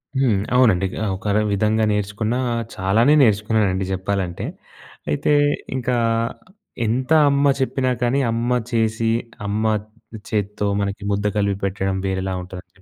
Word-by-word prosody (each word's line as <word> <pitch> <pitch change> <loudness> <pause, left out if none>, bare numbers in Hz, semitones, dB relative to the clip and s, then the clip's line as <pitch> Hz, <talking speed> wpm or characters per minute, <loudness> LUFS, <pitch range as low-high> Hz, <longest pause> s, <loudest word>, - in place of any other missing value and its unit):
హ్మ్. 130 -7 +2 0.2
అవునండి. 110 -7 +4
గ - - -8 0.2
ఒక‌ర 100 +2 -1 0.2
విధంగా 110 +2 +1
నేర్చుకున్నా 105 +3 -1 0.4
చాలానే 110 +9 +3
నేర్చుకున్నానండి 105 -4 +2
చెప్పాలంటే. 95 -2 -2 0.6
అయితే 75 - +1 0.4
ఇంకా 125 -1 -1 0.9
ఎంత 130 +6 -1 0.2
అమ్మ 140 0 +3
చెప్పినా 130 -1 0
కానీ 120 +3 +2
అమ్మ 115 +2 -1 0.2
చేసి, 115 -1 +1 0.4
అమ్మ 105 +2 -1 0.7
చేత్తో 105 0 -2 0.2
మనకి 100 0 -3
ముద్ద 100 +1 -1
కలిపి 100 -1 +1
పెట్టడం 95 0 -1
వేరేలా 95 0 -2
ఉంటదండి. 90 +1 -11
105 Hz, 115 wpm, -21 LUFS, 95-120 Hz, 0.9 s, అవునండి